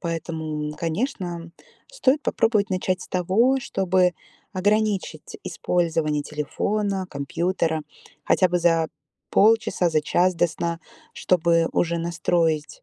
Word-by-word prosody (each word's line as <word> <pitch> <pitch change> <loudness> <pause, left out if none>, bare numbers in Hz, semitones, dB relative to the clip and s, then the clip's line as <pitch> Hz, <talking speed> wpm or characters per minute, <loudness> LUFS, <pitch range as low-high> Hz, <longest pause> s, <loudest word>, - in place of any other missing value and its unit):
Поэтому, 160 -3 -4
конечно, 170 - -3 0.4
стоит 295 - +1
попробовать 215 -3 +1
начать 185 0 -1
с - - -12
того, 210 +9 +2
чтобы 185 -4 +1 0.4
ограничить 210 - -1
использование 160 -4 0
телефона, 190 +7 -2
компьютера, 165 +2 -1 0.4
хотя 185 - +3
бы 175 0 +1
за 165 -1 +3 0.4
полчаса, 215 -5 +3
за 155 - +2
час 180 +4 +2
до 175 - +3
сна. 170 +1 -3 0.3
Чтобы 170 -2 +2
уже 170 0 +1
настроить 165 -2 -1
175 Hz, 110 wpm, -24 LUFS, 165-195 Hz, 0.4 s, хотя